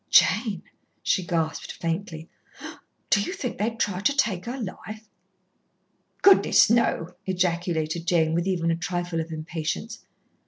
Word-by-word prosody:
"Jane!" 205 -8 +4 0.4
she 185 - +1
gasped 165 -2 -2
faintly, 165 -1 -4 0.8
"do 205 - +5
you 285 - -3
think 265 -12 -5
they'd 225 +2 -1
try 185 -3 0
to 280 +9 +1
take 195 -10 +1
her 250 +3 -5
life?" 215 +1 -7 1.2
"Goodness, 390 - +6
no!" 205 -7 +1
ejaculated 170 -3 -1
Jane, 160 -2 +2
with 170 +2 0
even 170 -3 +1
a - - +1
trifle 175 -1 -2
of 165 +1 -7
impatience. 160 +8 -4
180 Hz, 130 wpm, -25 LUFS, 165-215 Hz, 1.2 s, Goodness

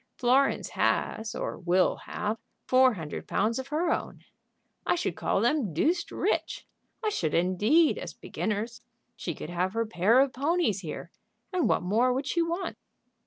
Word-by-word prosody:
Florence 265 +2 +2
has, 220 0 0
or - - -4
will 180 +1 +2
have, 215 +2 -2 0.3
four 255 -2 +5
hundred 160 -5 -6
pounds 225 +4 +1
of 260 - -5
her 325 +4 0
own. - - -3 0.6
I - - +2
should 255 - -2
call - - 0
them 235 - +1
deuced 340 - +1
rich. - - -1 0.4
I - - +3
should, 160 - -1
indeed, 210 - +3
as - - -7
beginners. 220 +2 -3 0.3
She 170 -9 -4
could 160 - -7
have 180 +2 -1
her 230 0 0
pair 215 +3 +3
of 270 -2 +3
ponies 285 - +1
here, 165 -5 -7 0.4
and 360 -4 +2
what - - +2
more 225 +7 +3
would 265 +3 -2
she 340 +4 +1
want?" 340 +3 -2
230 Hz, 165 wpm, -28 LUFS, 190-290 Hz, 0.6 s, four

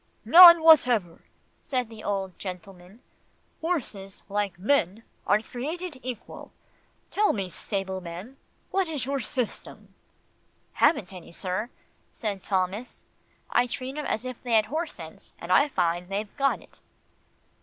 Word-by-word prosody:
"None 340 -1 +10
whatever," 245 - +4 0.4
said 255 -3 -2
the 220 -1 -12
old 195 -2 -3
gentleman. 185 +2 -9 0.6
"Horses, 225 - -4
like 200 -2 -2
men, 210 -1 +1 0.2
are 210 +2 +3
created 300 +6 -6
equal. 250 -4 -8 0.6
Tell 420 +1 +2
me, 195 -4 -3
stableman, 190 +4 -5 0.3
what 380 -3 0
is 295 -6 -2
your 275 +1 -1
system?" 250 -1 -5 0.8
"Haven't 195 - +2
any, 180 -2 -11
sir," 185 +6 -3 0.4
said 205 -4 -4
Thomas. 195 +5 -3 0.5
"I 245 +1 +3
treat 255 +2 -4
'em 300 - -4
as 225 - -2
if 255 -2 -7
they 245 -2 -3
had 215 -1 +5
horse 315 +7 -4
sense, 160 -2 -10
and 170 - -7
I 280 +10 +5
find 175 -4 -1
they've 205 +1 -4
got 275 -1 0
it." - - -22
215 Hz, 135 wpm, -26 LUFS, 190-270 Hz, 0.8 s, None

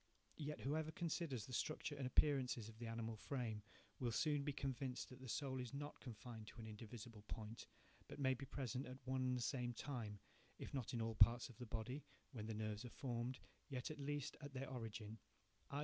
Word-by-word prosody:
Yet 150 0 -2
whoever 155 +3 +2
considers 160 - 0
the 130 - -7
structure 155 +3 +1
and 135 -2 0
appearances 130 -5 +5
of 110 0 -9
the 120 - -2
animal 115 0 -1
frame, 110 -2 -1 0.4
will 120 -2 +2
soon 145 +4 +4
be 145 - +2
convinced 135 -2 -1
that 130 0 -9
the 130 - -5
soul 130 +1 +1
is 125 +1 -2
not 145 +1 -3
confined 115 -2 -6
to - - -9
an 110 - -4
indivisible 110 0 -6
point, 110 0 -4 0.4
but - - -6
may 130 -2 +5
be 135 +1 -4
present 130 -1 -1
at 130 0 -5
one 130 0 +2
and 125 -1 +4
the 120 - +1
same 125 -1 +2
time, 115 -8 -2 0.4
if - - -5
not 130 -3 0
in 115 - +2
all 115 0 +1
parts 120 +3 +8
of 120 - -11
the 125 - -4
body, 120 +6 -1 0.3
when 110 -6 -3
the 110 - -1
nerves 110 0 0
are 125 - -4
formed, 125 0 -1 0.3
yet, 130 +2 -1
at 155 - -5
least 145 0 0
at 145 -1 -5
their 130 0 -1
origin, 110 -3 -3 0.5
i. 140 - 0
125 Hz, 210 wpm, -45 LUFS, 115-140 Hz, 0.5 s, parts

